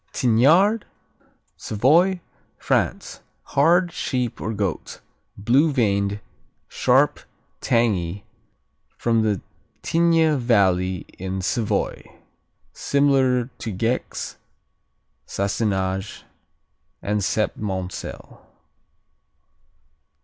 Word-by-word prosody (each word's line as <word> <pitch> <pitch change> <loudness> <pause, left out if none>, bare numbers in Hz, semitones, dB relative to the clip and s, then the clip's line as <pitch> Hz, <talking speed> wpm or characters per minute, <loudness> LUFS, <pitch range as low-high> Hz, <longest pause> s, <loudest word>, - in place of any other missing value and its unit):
Tignard 155 - +3 0.7
Savoy, 170 - +2 0.4
France - - -1 0.2
Hard; 170 +5 +3
sheep 125 -6 -3
or 110 - -2
goat; 100 -5 -3 0.4
blue 130 +10 +3
veined; 100 -5 0 0.5
sharp; - - +2 0.4
tangy; 100 -6 0 0.7
from 110 -4 +1 0.4
Tigne 165 -3 +3
Valley 95 -6 +1
in 95 +1 -4
Savoy. 110 +4 -1 0.7
Similar 135 -3 +1
to 115 - -4
Gex, 115 +6 -3 0.9
Sassenage 95 -1 -2 0.8
and 105 0 -1
Septmoncel. 95 -1 -3
115 Hz, 65 wpm, -22 LUFS, 100-140 Hz, 0.9 s, Tignard